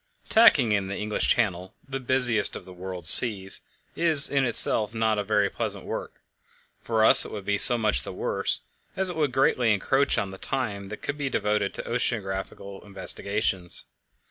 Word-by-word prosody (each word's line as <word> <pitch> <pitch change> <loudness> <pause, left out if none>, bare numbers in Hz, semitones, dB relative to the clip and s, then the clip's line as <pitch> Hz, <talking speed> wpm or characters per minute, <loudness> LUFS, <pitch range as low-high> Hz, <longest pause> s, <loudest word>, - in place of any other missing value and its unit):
Tacking 185 - +3
in 100 -2 -2
the 100 - -7
English 105 0 -4
Channel 95 -3 -3
the 135 0 -7
busiest 125 -3 +1
part - - -8
of - - -24
the 95 - -14
world's 90 -2 -1
seas 100 -5 +5 0.3
is 160 -4 +6
in 140 -2 -1
itself 115 -2 +4
no 110 -2 -2
very 105 0 -1
pleasant - - -7
work; - - -9 0.6
for 110 -1 -1
us - - +9
it - - -10
would 105 -3 -9
be 100 -1 -2
so 120 - +7
much 110 -3 0
the - - -9
worse, - - -4 0.4
as 190 -1 0
it - - -10
would 150 -4 -2
greatly 125 -2 0
encroach 135 +7 -1
on 100 -1 -4
the 95 - -13
time 105 -7 -6
that 105 - -11
could 145 +1 -6
be 140 -2 -4
devoted 105 -4 -3
to - - -8
oceanographical 100 -4 -6
investigations. 100 -2 -5
105 Hz, 180 wpm, -23 LUFS, 100-130 Hz, 0.6 s, us